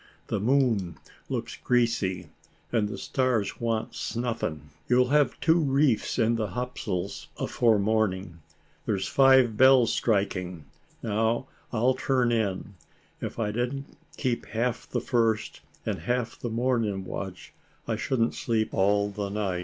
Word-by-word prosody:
The 105 - 0
moon 110 - +1 0.3
looks - - -3
greasy, 115 -7 +1 0.4
and 110 -3 +1
the - - -5
stars 125 -7 0
want 115 -2 -1
snuffing. 115 - -3 0.2
You'll 125 0 +4
have 145 0 +2
two 165 +1 +4
reefs 140 -5 +2
in 115 -1 +2
the 110 -2 -1
topsails 100 -4 -4
afore 115 -3 +2
morning. 100 -5 0 0.5
There's 100 -3 0
five 130 -5 +5
bells 130 -2 +6
striking. 90 -6 -1 0.4
Now, 115 +3 0 0.3
I'll 120 +3 +2
turn 125 -2 +1
in; 105 -3 -1 0.5
if - - -5
I 110 -3 -1
didn't 125 +5 -3 0.2
keep 125 -4 -1
half 115 +2 -2
the - - -1
first, 115 -3 0 0.2
and - - -2
half 120 +7 -2
the 120 - -3
morning 115 -5 0
watch, 95 0 -7 0.3
I 115 - 0
shouldn't 115 +1 0
sleep 110 -2 -1
all 100 +1 +2
the 100 0 -4
night. 100 -3 -2
115 Hz, 135 wpm, -27 LUFS, 100-125 Hz, 0.5 s, bells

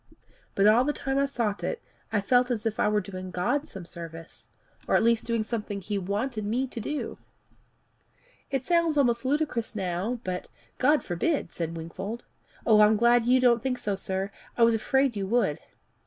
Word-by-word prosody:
But 195 - +3
all 220 +4 +6
the 295 +2 0
time 270 -1 -1
I 280 - +2
sought 230 -7 -2
it, 475 - -2 0.3
I 205 - +1
felt 245 +4 +3
as 230 -3 -2
if 220 -1 -1
I - - +3
were 210 0 +2
doing 185 -1 -7
God 230 - -1
service 170 - -9 0.4
or - - +2
at - - +4
least 230 0 +2
doing 230 -2 +1
something 210 -2 -4
he 200 +1 -3
wanted 210 +5 -2
me 235 +6 0
to 240 - -6
do. 290 +7 -4 1.3
It 270 -2 -2
sounds 335 -2 +2
almost 245 -3 +2
ludicrous 265 -5 -1
now, 195 +5 -2
but 180 -1 -4 0.2
" - - -36
"God 300 0 +4
forbid!" 175 - -1
said 165 -1 -3
Wingfold. 190 +8 -6 0.4
"I'm 215 -1 +6
glad 235 +1 +4
you 255 +1 +5
don't 240 -2 +4
think 255 +1 -1
so, 210 -5 -2
sir. 190 +1 -3 0.3
I 235 - +5
was 230 0 +6
afraid 265 +3 +1
you 195 -1 -2
would." 225 -9 +1
225 Hz, 185 wpm, -27 LUFS, 195-250 Hz, 1.3 s, all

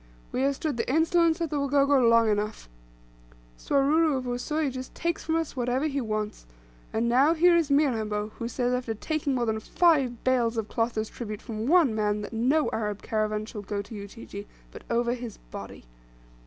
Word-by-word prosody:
We 255 - -1
have 275 +1 +2
stood 295 -3 -3
the 240 - -1
insolence 330 +2 +3
of 330 - -1
the 295 - 0
Wagogo 280 0 +3
long 230 -1 +5
enough. 210 - -1 0.9
Swaruru 285 - +2
of 255 - -3
Usui 270 +4 -1
just 255 0 -8
takes 340 -1 -2
from 320 - -1
us 325 -3 -2
whatever 250 +3 0
he 280 -2 -1
wants; 215 - -4 0.4
and 225 +2 0
now, 270 +7 +4
here 345 +2 +5
is 330 -3 +2
Mirambo, 220 -8 +1
who 230 - -2
says, 245 +1 -1
after 245 -3 -2
taking 290 +3 -2
more 245 -1 0
than 220 -1 -1
five 270 -3 +2
bales 240 -3 +1
of 220 -2 -1
cloth 230 0 -1
as 215 0 -1
tribute 215 -3 -6
from 225 -1 -4
one 325 -6 +5
man, 210 -1 0
that 205 - -7
no 265 +7 +2
Arab 210 -2 -3
caravan 215 -1 -1
shall 215 -1 -7
go 200 0 -4
to 205 - -12
Ujiji, 205 0 -8 0.2
but - - -10
over 235 +1 +1
his 240 -3 -7
body. - - -9
245 Hz, 190 wpm, -27 LUFS, 220-285 Hz, 0.9 s, long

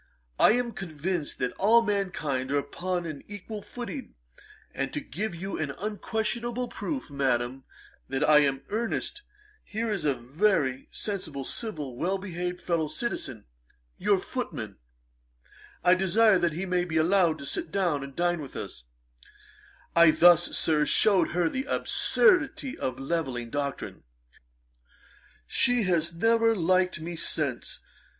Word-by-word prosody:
I - - +7
am 245 0 0
convinced 170 -3 -4
that 125 -1 -1
all 230 +4 +5
mankind 180 - -1
are 145 - +1
upon 175 +5 -2
an 155 -4 -6
equal 205 +1 -7
footing; 245 +5 -7 0.6
and 135 0 -2
to - - -1
give 175 - -4
you 190 +3 -5
an 155 -2 -1
unquestionable 230 +4 -2
proof, 270 - -5
Madam, 130 -1 -1 0.4
that 135 0 0
I 150 -1 +7
am 140 -2 +3
in 135 - -16
earnest, 230 - -2 0.4
here 220 +1 -3
is 195 -6 -2
a 145 -3 +2
very 135 - 0
sensible, 160 -10 -4
civil, 155 - -4
well 185 +7 0
behaved 180 -2 -4
fellow 165 -3 0
citizen, 150 - -4 0.5
your - - +3
footman; - - -5 1.1
I 180 +1 +6
desire 195 +2 +4
that 170 -3 +1
he 180 +5 -3
may 180 -1 +1
be 165 -2 -2
allowed 170 0 +3
to 140 - -8
sit 155 - -3
down 175 -8 0
and 140 -1 -9
dine 175 -1 +1
with 140 - -9
us." - - -7 1.1
I 170 -1 +8
thus, 175 +1 +5
Sir, 155 -2 +2
shewed 195 +5 +4
her 175 -1 +2
the 260 +10 -2
absurdity 360 - +2
of 130 - -3
the 135 - -8
levelling 135 -7 -2
doctrine. 140 -1 -4 1.4
She 245 -2 +2
has 170 -3 +1
never 225 +5 +3
liked 185 -1 +2
me 170 +2 -5
since. 145 -6 -2
175 Hz, 145 wpm, -28 LUFS, 145-205 Hz, 1.4 s, I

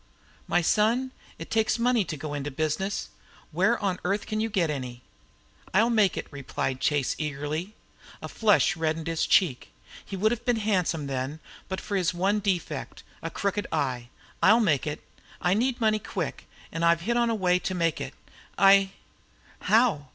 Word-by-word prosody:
"My 175 - +2
son, 230 +8 +2 0.3
it 165 - -9
takes 220 +1 +2
money 240 -2 +2
to 155 -2 -5
go 145 +1 -5
into 145 0 -3
business. 155 +7 -2 0.4
Where - - +2
on 195 -3 -1
earth 200 +3 -1
can 215 - -3
you 225 +1 0
get 180 -7 +1
any?" 125 -3 -6 0.7
"I'll 225 +4 +4
make 210 -6 +3
it," - - -3
replied 135 -2 -3
Chase, 145 -4 +1
eagerly. 155 +6 -3 0.4
A - - -6
flush 210 -2 +3
reddened 160 -1 -1
his 165 -1 -1
cheek. 150 -10 +2 0.3
He 195 - -7
would 215 +4 +2
have 240 0 -3
been 245 -1 +2
handsome 185 -8 0
then, 135 +2 -3 0.3
but 190 - -3
for 205 - -4
his 180 -2 +1
one 195 +4 +1
defect, 195 -4 -3 0.2
a - - -4
crooked 200 0 -2
eye. 130 -6 -2 0.3
"I'll 220 +4 +6
make 155 - +2
it. 150 0 -4 0.4
I 180 - +2
need 240 +4 0
money 215 -2 +2
quick - - -5 0.2
and 165 - -3
I've 170 0 +4
hit 235 +7 -1
on 240 0 +3
the 230 - +1
way 180 -3 +2
to 185 - -3
make 165 -2 0
it. - - -6 0.4
I 195 0 +6 0.3
" - - -30
"How?" 215 - +3
185 Hz, 180 wpm, -27 LUFS, 155-215 Hz, 0.7 s, I'll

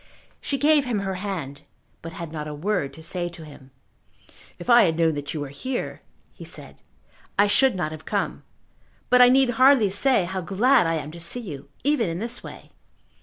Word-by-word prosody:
She 275 - -2
gave 295 0 +3
him 230 -5 -1
her 195 -1 -3
hand, 160 -9 -5 0.4
but 165 0 -8
had 165 -1 -7
not 150 -2 -5
a 150 - -6
word 175 -3 -1
to 160 - -12
say 175 +1 -1
to 165 -2 -11
him. 140 -3 -14 0.9
"If - - -10
I 240 -2 +7
had 165 -2 0
known 165 -1 +3
that 145 +1 -5
you - - -3
were 145 - -5
here," 245 - -5 0.3
he - - -12
said, - - -9 0.6
"I 205 - +6
should 260 +3 +3
not 175 -4 -2
have 155 0 -9
come; - - -2 0.7
but 250 0 +7
I 245 - +8
need 260 -1 +4
hardly 260 -7 +6
say 205 -1 +2
how 190 +1 -4
glad 215 +4 +3
I 165 - 0
am 155 -1 -5
to 170 - -10
see 170 +9 -4
you, 145 - -9
even 280 - +1
in 165 - -3
this 230 +5 -5
way." - - -11
185 Hz, 205 wpm, -24 LUFS, 160-245 Hz, 0.9 s, I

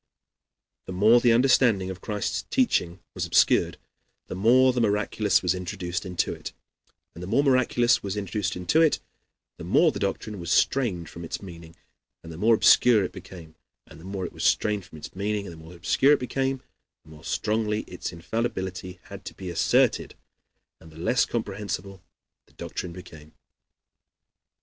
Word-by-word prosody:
The 95 - -5
more 110 +6 +5
the 120 - +4
understanding 115 -6 +3
of 95 0 -9
Christ's 105 -2 -2
teaching 95 - 0
was - - -3
obscured, - - +3 0.5
the - - -7
more 125 +6 +4
the 125 - 0
miraculous 105 -1 +1
was 90 0 +2
introduced 90 +1 -4
into 90 -2 -1
it; - - -8 0.6
and 85 - -11
the 90 - -6
more 120 +8 +2
the 140 - +4
miraculous 125 -1 +3
was 100 0 -4
introduced 100 -1 -2
into 90 - +2
it, 160 -2 +3 0.6
the - - -9
more - - +3
the - - -6
doctrine 105 -3 -3
was 85 -1 -6
strained 100 -12 +1
from 85 - -10
its 80 - -5
meaning 85 -3 -11 0.5
and 85 - -9
the 80 - -9
more 110 +5 +4
obscure 110 -1 +5
it 90 - -4
became; 80 -4 -12 0.3
and 80 - -15
the - - -14
more 95 0 -4
it - - -7
was - - -6
strained 105 -3 +1
from 95 - -13
its 75 - -10
meaning 100 +1 -2
and 85 - -8
the - - -12
more 85 +2 -12
obscure 110 - +3
it - - +2
became, 135 +1 -2 0.4
the 80 - -17
more 75 0 -14
strongly 105 +2 -1
its - - -7
infallibility 95 -1 -4
had 100 -1 -11
to - - -8
be 95 -2 -6
asserted, 85 - +1 0.6
and 80 - -15
the 80 - -15
less 115 +9 +2
comprehensible 100 -3 -5 0.5
the - - -27
doctrine 90 - -6
became. 80 -4 -13
100 Hz, 175 wpm, -25 LUFS, 90-115 Hz, 0.6 s, more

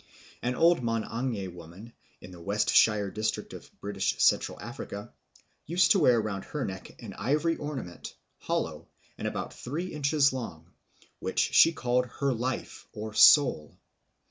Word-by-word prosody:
An 125 +1 -1
old 170 0 +4
Mang'anje 115 -2 -2
woman 90 +7 -12 0.3
in 90 - -11
the 90 -1 -12
West 100 +4 0
Shire 105 -3 +4
district 110 0 -3
of - - -11
British 100 -1 -2
Central - - +2
Africa 100 0 -8 0.5
used 170 +2 +3
to 195 - +5
wear 125 -7 +5
round 105 -3 -3
her 150 -3 -4
neck 95 -1 -8
an - - -7
ivory 150 +9 +1
ornament, 135 -12 -7 0.2
hollow, - - -3 0.3
and - - -2
about - - -4
three 165 +8 -5
inches 145 -1 +2
long, 85 -10 -7 0.5
which - - -5 0.2
she 165 - +7
called 125 -4 0
her 140 -1 +1
life 125 +2 -4
or 110 0 -6
soul. 125 - +5
120 Hz, 145 wpm, -28 LUFS, 100-145 Hz, 0.5 s, she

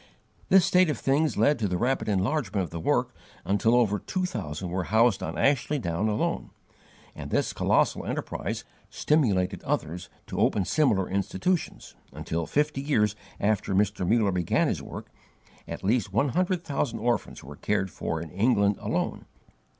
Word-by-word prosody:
This 190 -2 +6
state 180 -2 +4
of 150 - -1
things 145 +5 +1
led 145 -3 +3
to 105 - 0
the 90 -1 -1
rapid 125 +2 0
enlargement 105 0 0
of 85 - -7
the 85 - -5
work - - 0 0.3
until 105 +4 +2
over 105 -4 +2
two 185 - -2
thousand 90 - -4
were 90 0 -2
housed 110 0 +3
on - - -4
Ashley 145 +2 +2
Down 85 -3 -1
alone; 105 - -1 0.6
and - - -8
this - - 0
colossal - - +1
enterprise - - -3 0.3
stimulated 105 - +1
others 85 +3 -3 0.2
to - - -5
open 100 -3 +2
similar 100 - +2
institutions 105 - -2 0.2
until, 80 0 -4
fifty 150 -1 0
years 105 -8 +1 0.2
after 100 -1 0
Mr. 100 -1 +1
Muller 110 -3 +3
began 90 -2 +1
his - - -2
work, - - -9 0.6
at - - -7
least 105 -1 +1
one 135 +8 +2
hundred 180 +3 0
thousand 140 -5 -2
orphans 120 0 -2
were 70 +3 -10
cared 95 +2 -1
for 80 - -3
in 80 -1 -8
England 100 -1 +2
alone. - - -2
105 Hz, 160 wpm, -27 LUFS, 95-140 Hz, 0.6 s, This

